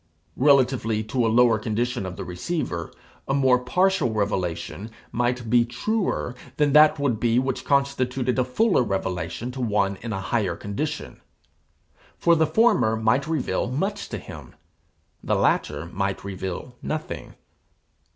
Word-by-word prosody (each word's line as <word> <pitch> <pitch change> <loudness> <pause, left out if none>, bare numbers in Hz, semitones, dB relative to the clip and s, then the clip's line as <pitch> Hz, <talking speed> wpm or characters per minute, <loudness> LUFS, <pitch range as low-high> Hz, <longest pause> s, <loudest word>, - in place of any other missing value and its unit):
Relatively 130 -5 +3
to 115 +2 0
a - - +2
lower 115 -1 +4
condition 115 0 -2
of 90 - -6
the - - -6
receiver, 90 - -4 0.4
a 135 - +1
more 130 -2 +4
partial 180 - +1
revelation 100 -1 -2 0.2
might 120 0 -1
be 120 +1 +4
truer 125 - -2 0.2
than 145 -2 +2
that 150 +1 +7
would 135 -6 0
be 115 0 +2
which 130 +1 0
constituted 130 -2 0
a - - +4
fuller 185 - +2
revelation 95 +1 -3
to 130 0 -6
one 100 -4 +1
in 115 - -5
a 95 - -2
higher 95 -3 -1
condition; 145 - -5 1.0
for 170 0 +4
the 160 -1 +3
former 205 - +3
might 110 +6 +1
reveal 155 -6 -1
much 195 +10 -2
to - - -4
him, - - -11 0.7
the - - +1
latter 75 +1 +1
might 95 +3 -3
reveal 95 +4 -5
nothing. 155 0 -5
120 Hz, 140 wpm, -24 LUFS, 105-140 Hz, 1.0 s, that